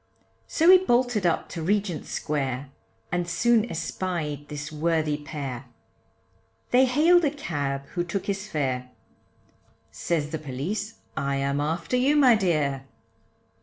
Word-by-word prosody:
So 335 +3 +5
he 370 - +9
bolted 245 - +2
up 170 - 0
to 165 - -5
Regent 195 -2 -1
Square, 135 -2 -3 0.4
And 175 0 -1
soon 230 +6 +2
espied 155 -5 -3
this 150 0 -6
worthy 155 -1 0
pair, 140 -4 -6 1.1
They 255 +2 +6
hailed 320 +7 +4
a 295 - +3
cab, 140 - -3
who 175 - -2
took 175 +2 -3
his 195 0 -3
fare, 130 -7 -2 1.0
Says 155 -3 -2
the 160 - -3
police, 175 - -4 0.2
I 140 0 -1
am 140 +1 0
after 165 +9 -1
you 270 +4 +3
my 270 -5 +6
dear. 150 -10 0
165 Hz, 130 wpm, -26 LUFS, 145-215 Hz, 1.1 s, he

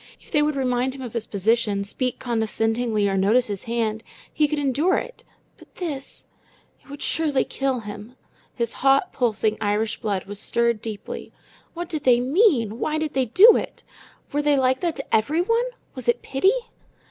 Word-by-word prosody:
If - - -20
they 300 - +3
would 300 0 +1
remind 255 0 0
him 265 - -8
of 240 - -7
his 230 -2 -3
position, 210 0 +1
speak 250 +5 -2
condescendingly, 225 -2 0
or 195 - 0
notice 210 +6 +3
his 205 -3 -5
hand, 225 -2 -1 0.3
he 300 - +3
could 300 - -2
endure 290 +6 +1
it, - - -6 0.4
but - - -19
this 295 -7 -4 0.7
it 285 - -9
surely 315 -2 0
would 265 - +1
kill 270 -3 -1
him! 210 +3 -9 0.4
His 235 -2 -1
hot, 275 +5 +3
pulsing 220 -3 0
Irish 215 +2 -1
blood 200 -3 -2
was 200 0 -7
stirred 235 0 +1
deeply. 215 -3 -7 0.4
What 345 +1 -4
did 310 -4 -4
they 245 -2 +5
mean? 255 - +2
Why 310 0 -1
did 310 -1 -2
they 265 -1 +1
do 400 - +7
it? - - -4 0.5
Were 295 - +1
they 295 -1 +3
like 260 0 +2
that 340 -2 -1
to 275 - -2
everyone? 345 - +1 0.3
Was 255 -3 -4
it 240 - +1
pity? 380 - +2
250 Hz, 180 wpm, -23 LUFS, 220-295 Hz, 0.7 s, do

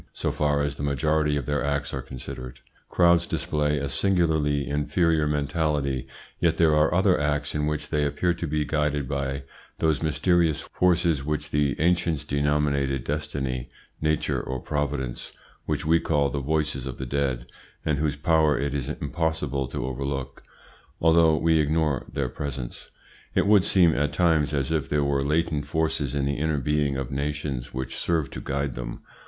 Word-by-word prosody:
So - - -2
far 75 -1 +1
as 70 -1 -2
the - - -6
majority 75 +2 +1
of 70 - -3
their 75 -1 0
acts 70 +2 -1
are 65 - -2
considered, 65 -1 -8 0.3
crowds 85 -1 +4
display 75 -2 0
a 70 0 -2
singularly 80 -5 +1
inferior 75 +2 +1
mentality; 75 -2 0 0.3
yet - - +2
there 80 -2 +4
are 75 +1 +4
other 95 +1 +3
acts 75 -1 -1
in 75 0 0
which 75 -1 -3
they 75 -1 +1
appear 85 +5 +1
to 85 0 -4
be 75 0 0
guided 75 -3 0
by 70 0 -2 0.3
those 80 -2 +1
mysterious 80 0 +2
forces 85 -5 +1
which 75 +1 -3
the 70 -2 +1
ancients 85 -1 +1
denominated 70 -2 0
destiny, 70 -4 -3 0.3
nature, 75 -1 0
or 65 0 -4
providence, 70 -3 -3 0.3
which 75 0 -1
we 80 +1 +4
call 70 -4 +1
the 70 - -2
voices 75 -2 -1
of 65 - -6
the 65 - -4
dead, 65 -2 -1 0.4
and 75 -2 +1
whose 75 -2 0
power 75 -1 +3
it 70 +1 -1
is 70 -1 -3
impossible 75 -3 -2
to - - -4
overlook, 70 +1 -4 0.6
although 80 -1 +5
we 80 +1 +3
ignore 75 -2 0
their 70 -2 -2
essence. 65 -4 -5 0.5
It - - +3
would 100 -2 +5
seem, 90 -5 +4
at 75 +1 0
times, 80 -5 +2
as 70 -1 -1
if 75 -4 -1
there 75 -1 +2
were 70 -1 +1
latent 75 0 0
forces 75 -3 -1
in 70 -1 0
the 70 0 -1
inner 80 0 0
being 70 0 0
of 65 -2 -4
nations 70 -2 -3
which 65 -1 -4
serve 80 -5 0
to - - -6
guide 70 0 -2
them. - - -6
75 Hz, 170 wpm, -25 LUFS, 70-80 Hz, 0.6 s, although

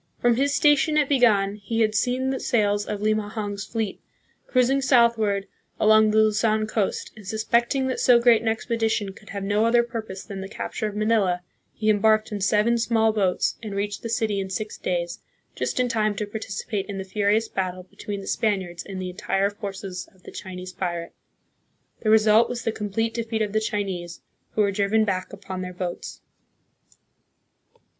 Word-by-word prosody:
From 240 -1 +3
his 280 +2 +2
station 295 +1 +4
at 295 -2 +3
Bigan 210 -7 +3
he 225 +3 -2
had 215 -1 +2
seen 255 +4 0
the 265 - -2
sails 205 -3 +1
of 210 -1 -4
Limahong's 210 -1 -1
fleet, 220 -4 -3 0.5
cruising 255 +2 +2
southward 235 -6 +3 0.3
along 215 0 +5
the 215 - +1
Luzon 215 0 +3
coast, 215 -2 -2
and, 210 -3 -13
suspecting 235 +5 +1
that 260 - -2
so 245 -2 +6
great 235 -2 +5
an 230 - -4
expedition 220 -3 0
could 210 +2 -16
have 200 -2 -5
no 205 +2 +1
other 235 +1 +4
purpose 220 -5 -6
than 195 -3 -7
the 190 - -7
capture 215 - -4
of 210 - -6
Manila, 210 -5 +1 0.3
he 215 - -4
embarked 215 +1 +3
in 205 -1 -4
seven 210 +5 +3
small 225 -1 +2
boats, 190 -4 0
and 210 -3 -6
reached 205 +1 -2
the 230 - -5
city 220 -3 0
in 190 -1 -3
six 210 +3 -4
days, 175 -1 -3 0.3
just - - -2
in 250 - +3
time 215 -3 0
to 210 - -2
participate 205 -1 -4
in 200 -2 -5
the 190 - -3
furious 210 +3 +1
battle 185 -2 -3
between 200 +1 -7
the - - -9
Spaniards 190 -6 -1
and 195 -2 -7
the 185 -1 -4
entire 195 +1 0
forces 195 -2 -6
of 185 - -26
the - - -10
Chinese 185 -1 -8
pirate. 175 -2 -4 0.9
The 215 - -1
result 220 +1 +5
was 240 -1 -4
the 225 - 0
complete 225 +2 -2
defeat 225 -1 -1
of 210 -1 -4
the 215 - +3
Chinese, 190 -6 -3 0.3
who 215 - +2
were 200 -1 +3
driven 205 +2 +2
back 185 -3 -2
upon 190 -2 -6
their 180 0 -5
boats. 180 -1 -5
215 Hz, 180 wpm, -24 LUFS, 195-225 Hz, 0.9 s, so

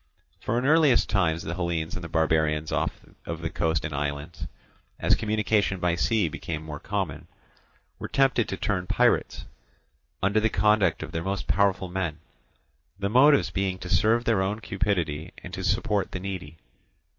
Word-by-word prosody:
For 115 - -1
in 125 - 0
early 150 -3 +5
times 85 -8 +1
the 85 - -4
Hellenes 85 -2 -2
and 90 - -5
the 85 - -6
barbarians 80 -1 +1
of - - +1 0.3
the 85 0 -4
coast 80 -2 0
and 75 - -4
islands, 70 +3 -4 0.5
as - - +3
communication 105 -2 +1
by 90 -1 +1
sea 105 +2 +1
became 80 0 -5
more 75 -2 -6
common, 85 -5 -3 0.7
were - - -5
tempted 135 -4 +2
to 95 - -3
turn 90 -3 -1
pirates, - - +1 0.8
under 100 +3 +3
the 110 +1 +2
conduct 100 -3 +2
of - - -7
their 80 - -3
most 95 +2 -3
powerful 100 -1 +1
men; 90 -4 -3 0.8
the 100 0 -2
motives 140 +6 +5
being 95 -1 -1
to 90 - -8
serve 115 +4 +3
their 110 -5 +2
own 100 +3 -1
cupidity 90 -7 -2
and 90 - -9
to 95 - -4
support 105 +1 0
the 95 - -3
needy. 90 -5 -6
95 Hz, 165 wpm, -26 LUFS, 80-105 Hz, 0.8 s, early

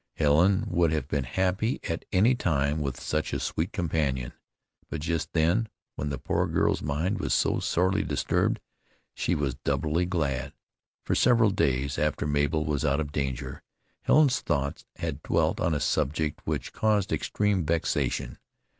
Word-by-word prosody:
Helen 80 +6 +4
would 85 -2 +2
have 75 -4 -1
been 70 -3 -1
happy 95 - 0
at 80 - -3
any 105 +7 +4
time 75 - 0
with 70 -3 -3
such 75 0 -2
a - - 0
sweet 80 +3 -2
companion, 75 - -1 0.6
but 80 - -3
just 80 0 -2
then, 85 +8 +2 0.2
when 75 - -3
the 70 - -3
poor - - 0
girl's - - +1
mind 75 +8 -1
was - - +1
so - - +2
sorely 95 +3 +1
disturbed 75 -7 0 0.5
she 90 - 0
was 70 -4 -1
doubly 75 +5 0
glad. 70 -7 -1 0.5
For - - 0
several 115 -4 +4
days, 70 -3 0
after 75 -1 0
Mabel 75 +1 +1
was 75 -1 -1
out 70 -1 +2
of 75 -2 -3
danger, 70 -3 -3 0.4
Helen's 140 -3 +4
thoughts 70 +2 -2
had - - -4
dwelt - - +1
on 80 - +1
a - - 0
subject 75 +1 0
which - - -3
caused 105 -2 +1
extreme 105 -3 0
vexation. 80 -6 -1
80 Hz, 155 wpm, -27 LUFS, 70-90 Hz, 0.6 s, Helen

